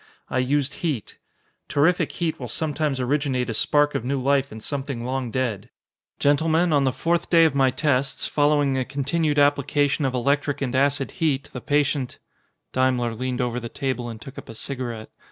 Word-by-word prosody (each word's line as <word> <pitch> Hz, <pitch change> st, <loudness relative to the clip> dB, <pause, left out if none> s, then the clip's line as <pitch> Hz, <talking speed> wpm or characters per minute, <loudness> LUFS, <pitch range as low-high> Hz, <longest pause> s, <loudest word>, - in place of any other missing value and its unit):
"I 130 Hz, -, +1 dB
used 140 Hz, +2 st, +1 dB
heat. 145 Hz, -, -3 dB, 0.5 s
Terrific 160 Hz, +5 st, +2 dB
heat 165 Hz, -2 st, -2 dB
will 125 Hz, -, -5 dB
sometimes 150 Hz, 0 st, -1 dB
originate 130 Hz, -2 st, 0 dB
a -, -, -3 dB
spark 145 Hz, +6 st, +2 dB
of -, -, -2 dB
new 135 Hz, +2 st, -1 dB
life 140 Hz, +1 st, +1 dB
in 110 Hz, -, -8 dB
something 135 Hz, 0 st, -3 dB
long 130 Hz, 0 st, -2 dB
dead. 115 Hz, -3 st, -2 dB, 0.5 s
Gentlemen, 160 Hz, +3 st, +2 dB
on 140 Hz, -2 st, +3 dB
the 130 Hz, -, +2 dB
fourth 170 Hz, +6 st, -1 dB
day 165 Hz, -1 st, +6 dB
of 160 Hz, -, +2 dB
my 135 Hz, -1 st, +4 dB
tests, 135 Hz, 0 st, 0 dB
following 145 Hz, -2 st, +2 dB
a -, -, +1 dB
continued 145 Hz, +3 st, -1 dB
application 145 Hz, 0 st, +2 dB
of 130 Hz, -2 st, 0 dB
electric 140 Hz, +3 st, 0 dB
and 130 Hz, -3 st, -2 dB
acid 140 Hz, +1 st, +1 dB
heat, 145 Hz, -3 st, 0 dB
the 125 Hz, -, -6 dB
patient 145 Hz, -2 st, 0 dB, 0.3 s
" -, -, -48 dB
Daimler 125 Hz, -2 st, +1 dB
leaned 125 Hz, +2 st, -2 dB
over 125 Hz, 0 st, -1 dB
the 120 Hz, -1 st, -6 dB
table 130 Hz, -3 st, -3 dB
and 115 Hz, -1 st, -8 dB
took 135 Hz, +3 st, -9 dB
up -, -, -13 dB
a 115 Hz, -, -8 dB
cigarette. 120 Hz, -3 st, -5 dB
135 Hz, 185 wpm, -24 LUFS, 125-145 Hz, 0.5 s, day